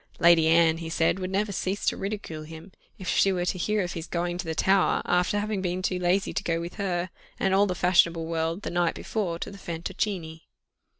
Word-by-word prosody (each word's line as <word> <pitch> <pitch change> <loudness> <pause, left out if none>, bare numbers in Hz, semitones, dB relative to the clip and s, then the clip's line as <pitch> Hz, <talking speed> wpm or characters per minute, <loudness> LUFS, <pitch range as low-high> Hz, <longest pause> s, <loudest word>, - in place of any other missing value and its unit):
Lady 170 -2 +5
Anne, 165 0 +4
he 165 -1 -5
said, 165 +3 +1
would 185 0 -3
never 200 +2 0
cease 195 +1 -2
to - - +2
ridicule 195 -6 -5
him, 160 +4 -11 0.3
if 185 - -8
she 195 - +3
were 180 -2 -1
to 185 - -2
hear 210 +2 +1
of 175 - -4
his 165 0 -6
going 175 0 -2
to 180 - -4
the 160 -1 -3
Tower, 190 +2 +3
after 180 +3 +2
having 205 -1 -2
been 180 0 -2
too 185 -1 0
lazy 180 +2 +1
to - - -2
go 165 -1 0
with 170 +4 -7
her, 180 -3 -2 0.3
and 190 - +1
all 200 +1 +4
the 180 - -2
fashionable 170 -2 +3
world, 165 +3 -2
the - - -3
night 175 -1 +1
before, 190 -7 -3
to 185 - -6
the 200 - -11
Fantoccini. 170 -1 -4
180 Hz, 225 wpm, -26 LUFS, 165-195 Hz, 0.3 s, Lady